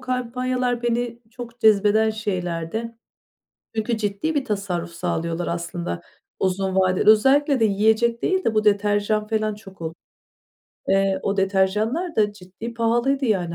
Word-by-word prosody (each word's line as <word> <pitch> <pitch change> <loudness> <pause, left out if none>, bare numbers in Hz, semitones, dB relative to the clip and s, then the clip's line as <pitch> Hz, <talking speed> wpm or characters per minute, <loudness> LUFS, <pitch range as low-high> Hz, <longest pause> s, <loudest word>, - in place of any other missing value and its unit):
kampanyalar 250 -1 -2
beni 240 0 -1
çok 240 0 -10
cezbeden 215 +1 +4
şeylerdi. 205 +1 -3 0.8
Çünkü 220 +1 -1
ciddi 210 +9 -2
bir 275 -2 0
tasarruf 190 -6 -2
sağlıyorlar 170 +1 -2
aslında 170 - -4 0.4
uzun 190 0 0
vadeli. 185 +2 +3
Özellikle 270 +5 +4
de 225 - +4
yiyecek 220 +3 +2
değil 375 0 +1
de 220 - 0
bu 215 - +3
deterjan 205 +1 +1
falan 215 -1 -1
çok 195 -4 -14
ol 160 0 -4 1.0
eee, 195 0 +2
o 200 - -1
deterjanlar 210 - 0
da 210 -1 +2
ciddi 205 +4 -9
pahalıydı 240 +4 +1
yani, 180 -7 0
215 Hz, 135 wpm, -23 LUFS, 190-235 Hz, 1.0 s, cezbeden